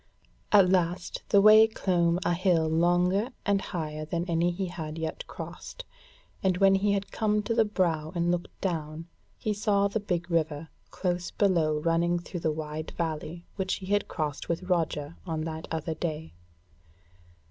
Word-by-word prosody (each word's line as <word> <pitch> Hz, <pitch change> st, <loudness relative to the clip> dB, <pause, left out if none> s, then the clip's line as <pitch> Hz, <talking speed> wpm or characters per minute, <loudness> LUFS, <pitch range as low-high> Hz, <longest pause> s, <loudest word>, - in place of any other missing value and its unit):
At 200 Hz, -3 st, +7 dB
last 180 Hz, -1 st, 0 dB
the 200 Hz, -, +6 dB
way 215 Hz, +2 st, +8 dB
clomb 175 Hz, -5 st, +1 dB
a -, -, +2 dB
hill 170 Hz, -2 st, +2 dB
longer 175 Hz, +6 st, +2 dB, 0.2 s
and 200 Hz, -1 st, +2 dB
higher 155 Hz, -4 st, -4 dB
than 170 Hz, +2 st, -2 dB
any 170 Hz, 0 st, +2 dB
he 185 Hz, +2 st, -2 dB
had 160 Hz, -3 st, -6 dB
yet 160 Hz, -1 st, -4 dB
crossed, -, -, -8 dB, 0.6 s
and 185 Hz, -2 st, +2 dB
when 195 Hz, 0 st, +5 dB
he 200 Hz, +1 st, +2 dB
had 200 Hz, 0 st, -2 dB
come 210 Hz, -1 st, +1 dB
to 230 Hz, -, -1 dB
the 225 Hz, -1 st, +4 dB
brow 165 Hz, -7 st, 0 dB
and 170 Hz, 0 st, +1 dB
looked 175 Hz, 0 st, -4 dB
down, 160 Hz, -3 st, -3 dB, 0.3 s
he 215 Hz, -, -1 dB
saw 200 Hz, -1 st, +2 dB
the 200 Hz, +2 st, -2 dB
big 175 Hz, -4 st, -3 dB
river 160 Hz, -1 st, 0 dB, 0.2 s
close 175 Hz, -2 st, -2 dB
below 170 Hz, -7 st, +2 dB
running 170 Hz, +2 st, +1 dB
through 175 Hz, +1 st, -6 dB
the 160 Hz, -, 0 dB
wide 155 Hz, 0 st, -5 dB
valley 165 Hz, +1 st, -3 dB
which 190 Hz, -1 st, 0 dB
he 190 Hz, -, -8 dB
had 205 Hz, -, +1 dB
crossed 150 Hz, -3 st, -4 dB
with 170 Hz, +2 st, -1 dB
Roger 165 Hz, -4 st, -1 dB
on 160 Hz, -2 st, -2 dB
that 160 Hz, 0 st, -5 dB
other 160 Hz, 0 st, -2 dB
day. 160 Hz, 0 st, -4 dB
175 Hz, 170 wpm, -28 LUFS, 160-195 Hz, 0.6 s, way